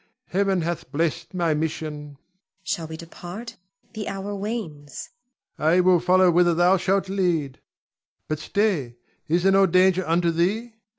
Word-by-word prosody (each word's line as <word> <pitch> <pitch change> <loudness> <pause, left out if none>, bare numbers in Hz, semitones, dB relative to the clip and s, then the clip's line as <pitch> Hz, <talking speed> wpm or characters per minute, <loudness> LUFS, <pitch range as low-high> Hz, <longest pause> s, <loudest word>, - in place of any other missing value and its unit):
Heaven 195 -1 +1
hath 170 0 -4
blessed 165 +4 -2
my 170 -3 +1
mission. 150 -1 -4
Zuleika. - - -22 0.5
Shall 170 -4 -3
we 160 0 -7
depart? 180 +7 -9 0.4
The 215 -2 -5
hour 195 +1 -4
wanes. 195 - -6 0.5
Ion. 160 +2 +3
I - - +4
will 180 -1 +4
follow 180 +1 +4
whither 175 0 +3
thou 175 +3 +4
shalt 190 +2 0
lead. 175 -8 -1 0.7
But, 155 -1 -2
stay! 155 - -1 0.3
is 170 +3 +1
there 195 - +5
no 195 0 +5
danger 185 +1 +3
unto 170 +1 +2
thee? 205 +8 -1
175 Hz, 155 wpm, -24 LUFS, 160-195 Hz, 0.7 s, there